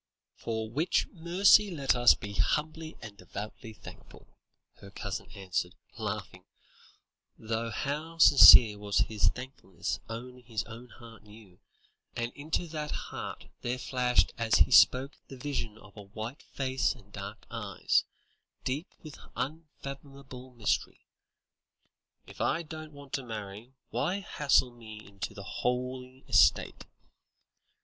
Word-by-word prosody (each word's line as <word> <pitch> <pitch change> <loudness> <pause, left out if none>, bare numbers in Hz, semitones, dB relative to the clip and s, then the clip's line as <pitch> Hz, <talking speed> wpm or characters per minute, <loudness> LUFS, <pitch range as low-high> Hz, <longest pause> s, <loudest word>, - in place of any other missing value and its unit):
"For 110 -1 -4
which 150 +10 +1
mercy 185 +4 +4
let 140 -7 +1
us 120 0 +6
be 100 0 -8
humbly 155 +7 -1
and 105 -2 -9
devoutly 105 +4 -8
thankful," - - -14 0.5
her 100 - -13
cousin 95 - -6
answered, 95 -2 -3 0.2
laughing, 105 -4 -5 0.9
though 115 +1 -3
how 150 +8 -4
sincere 115 -8 +9
was 105 -1 -2
his 105 -4 +1
thankfulness 125 -4 -4
only 125 +2 -7
his 115 -3 -4
own 115 +2 -11
heart 115 -2 -14
knew, 105 -3 -17 0.6
and 120 +1 -3
into 155 +4 -2
that 155 -1 -4
heart - - -6 0.2
there 120 +1 -2
flashed 125 -1 +1
as 115 0 +2
he - - +5
spoke 130 +2 +5
the 135 - -10
vision 125 -5 -4
of 105 -1 -17
a 105 - -9
white 110 +6 -7
face 130 0 -1
and 105 -4 -19
dark - - -8
eyes, - - 0 0.6
deep 145 +7 -2 0.2
with 155 -3 -10 0.2
unfathomable 140 -2 -7
mystery; 110 -3 -1 1.2
"if - - -10
I 170 - +1
don't 155 -1 -9
want 140 -2 -14
to 135 - -1
marry, 110 +2 -8 0.2
why 195 +3 -1
hustle 140 -7 +2
me 110 -3 -11
into 100 -1 -7
the 100 - -8
holy 125 +3 -3
estate? - - +3
125 Hz, 130 wpm, -30 LUFS, 110-140 Hz, 1.2 s, sincere